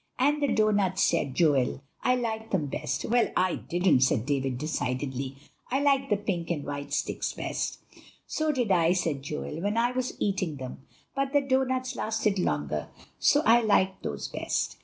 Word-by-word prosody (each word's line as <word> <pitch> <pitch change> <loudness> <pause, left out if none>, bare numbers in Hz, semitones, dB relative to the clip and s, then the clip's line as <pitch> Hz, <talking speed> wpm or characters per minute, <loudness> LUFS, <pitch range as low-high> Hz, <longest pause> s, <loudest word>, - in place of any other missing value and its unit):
"And 290 +3 +2
the 285 - +3
doughnuts," 205 -3 +2
said 140 -6 +1
Joel; 140 -4 +2 0.2
"I 250 - +3
liked 225 -2 -3
them 175 -6 0
best." 140 - -3
"Well, 240 0 +2
I 185 -1 +2
didn't," 175 -5 +2
said 125 -3 +2
David 135 -3 -1
decidedly; 130 -2 -3 0.3
"I 265 - +1
liked 275 -1 +2
the 210 - +3
pink 190 -5 -3
and 155 -4 -1
white 145 0 -5
sticks - - -1
best." - - -3 0.5
"So 310 0 0
did 245 -7 0
I," 170 -1 +4
said 165 -6 -1
Joel, 150 +2 -5
"when 205 +4 -1
I 240 +1 +3
was 255 0 -3
eating 190 -6 -1
them; 130 -1 -7 0.3
but 275 0 -1
the 285 - +5
doughnuts 260 -1 0
lasted 215 -3 0
longer, 75 - -1 0.3
so 295 +1 +4
I 235 +2 +6
liked 190 -3 +2
those 70 - -4
best." - - -2
190 Hz, 175 wpm, -28 LUFS, -, 0.5 s, I